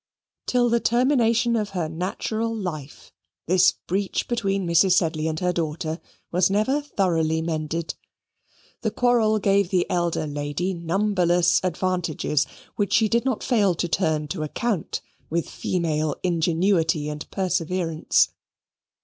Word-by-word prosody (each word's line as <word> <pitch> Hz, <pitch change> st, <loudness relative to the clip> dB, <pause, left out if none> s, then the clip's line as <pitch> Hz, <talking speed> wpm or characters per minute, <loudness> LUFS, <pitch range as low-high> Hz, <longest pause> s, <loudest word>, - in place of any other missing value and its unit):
Till 245 Hz, -1 st, +3 dB
the 235 Hz, 0 st, +2 dB
termination 235 Hz, -1 st, +2 dB
of 210 Hz, -2 st, -1 dB
her 165 Hz, -3 st, 0 dB
natural 215 Hz, +7 st, -3 dB
life, 155 Hz, -9 st, -6 dB, 0.3 s
this 185 Hz, +1 st, +5 dB
breach 195 Hz, +1 st, -1 dB
between 195 Hz, -5 st, -1 dB
Mrs. 170 Hz, +2 st, +4 dB
Sedley 160 Hz, -3 st, +1 dB
and 155 Hz, 0 st, -2 dB
her 180 Hz, 0 st, +1 dB
daughter 160 Hz, 0 st, -3 dB, 0.3 s
was 180 Hz, +1 st, +3 dB
never 215 Hz, +9 st, +1 dB
thoroughly 165 Hz, -, 0 dB
mended. 160 Hz, 0 st, -3 dB, 0.9 s
The 220 Hz, -, 0 dB
quarrel 225 Hz, -1 st, +2 dB
gave 200 Hz, -2 st, +2 dB
the 185 Hz, -2 st, +1 dB
elder 175 Hz, -3 st, 0 dB
lady 145 Hz, +5 st, -2 dB
numberless 175 Hz, 0 st, +2 dB
advantages 175 Hz, -4 st, 0 dB, 0.3 s
which 205 Hz, -1 st, 0 dB
she 220 Hz, -1 st, +4 dB
did 235 Hz, +3 st, +1 dB
not 260 Hz, -5 st, -1 dB
fail 205 Hz, -8 st, +2 dB
to 175 Hz, -, -1 dB
turn 160 Hz, -3 st, 0 dB
to 170 Hz, -2 st, -4 dB
account 185 Hz, +4 st, -2 dB, 0.3 s
with 165 Hz, 0 st, -1 dB
female 155 Hz, -4 st, -1 dB
ingenuity 165 Hz, -2 st, +1 dB
and 150 Hz, 0 st, -6 dB
perseverance. 175 Hz, -3 st, +1 dB
180 Hz, 130 wpm, -24 LUFS, 160-210 Hz, 0.9 s, this